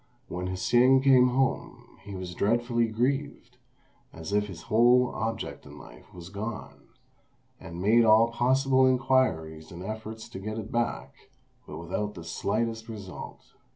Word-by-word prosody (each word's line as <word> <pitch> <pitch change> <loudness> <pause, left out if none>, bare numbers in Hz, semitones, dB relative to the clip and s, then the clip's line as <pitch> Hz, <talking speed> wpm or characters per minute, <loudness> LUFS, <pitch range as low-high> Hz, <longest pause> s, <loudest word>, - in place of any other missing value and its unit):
When 90 +1 -4
Hsing 120 +8 +3
came 130 -2 +6
home, 130 +2 -2
he 100 -1 -9
was 90 -1 -6
dreadfully 120 +4 +1
grieved, 135 +6 -2 0.5
as 80 +4 -7
if 105 0 +1
his 85 -5 -10
whole 120 +2 +4
object 115 0 -4
in 75 0 -13
life 70 - -15
was 85 -1 -11
gone; 105 +2 -7 0.7
and 85 +1 -9
made 110 +5 +4
all 110 +1 +5
possible 130 +2 +3
inquiries 120 -13 0
and 90 +1 -8
efforts 110 +2 -7
to - - -8
get 110 +3 -5
it 110 0 -6
back, 120 0 -2 0.5
but 75 - -8
without 100 +5 -4
the 85 - -9
slightest 110 +6 -2
result. 100 -5 -9
110 Hz, 145 wpm, -27 LUFS, 95-120 Hz, 0.7 s, came